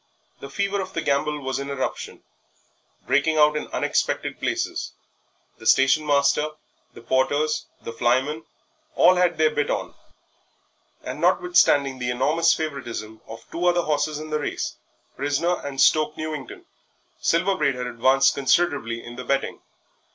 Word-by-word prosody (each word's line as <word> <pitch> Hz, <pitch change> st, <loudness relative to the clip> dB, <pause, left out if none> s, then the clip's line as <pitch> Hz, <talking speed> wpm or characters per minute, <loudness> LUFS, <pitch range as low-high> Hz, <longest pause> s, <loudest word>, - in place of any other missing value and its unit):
The 140 Hz, -, -9 dB
fever 200 Hz, +6 st, -1 dB
of 190 Hz, 0 st, -7 dB
the 165 Hz, -, -2 dB
gamble 150 Hz, +1 st, 0 dB
was 135 Hz, 0 st, -3 dB
in 140 Hz, 0 st, -5 dB
eruption, 140 Hz, -1 st, -4 dB, 0.8 s
breaking 145 Hz, +4 st, +2 dB
out 150 Hz, 0 st, +5 dB
in 150 Hz, -, -3 dB
unexpected -, -, -1 dB
places -, -, -2 dB, 0.7 s
the 110 Hz, -, -6 dB
station 135 Hz, +3 st, +4 dB
master, 145 Hz, +1 st, +2 dB, 0.4 s
the -, -, -12 dB
porters, 145 Hz, +5 st, 0 dB, 0.2 s
the 115 Hz, -, -6 dB
flymen, 130 Hz, +7 st, 0 dB, 0.5 s
all 185 Hz, -, +6 dB
had 180 Hz, -2 st, +2 dB
their 155 Hz, 0 st, +3 dB
bit 145 Hz, -1 st, -1 dB
on, -, -, -2 dB, 1.1 s
and -, -, -6 dB
notwithstanding 140 Hz, -, +3 dB
the 125 Hz, 0 st, -2 dB
enormous 150 Hz, +7 st, +2 dB
favouritism 120 Hz, -8 st, -5 dB
of 115 Hz, -, -10 dB
two 170 Hz, -, -4 dB
other 175 Hz, 0 st, +3 dB
horses 155 Hz, 0 st, -1 dB
in 155 Hz, 0 st, -8 dB
the 150 Hz, -, 0 dB
race 145 Hz, -, -3 dB, 0.4 s
Prisoner 145 Hz, +6 st, 0 dB
and 140 Hz, -1 st, -6 dB
Stoke 155 Hz, +3 st, +3 dB
Newington 155 Hz, -4 st, -6 dB, 0.5 s
Silver 180 Hz, +4 st, +1 dB
Braid 140 Hz, -6 st, +1 dB
had 125 Hz, 0 st, -4 dB
advanced 130 Hz, +3 st, +3 dB
considerably 135 Hz, -4 st, 0 dB
in 120 Hz, 0 st, -10 dB
the 125 Hz, -, -6 dB
betting. 135 Hz, +2 st, -2 dB
145 Hz, 145 wpm, -23 LUFS, 130-155 Hz, 1.1 s, all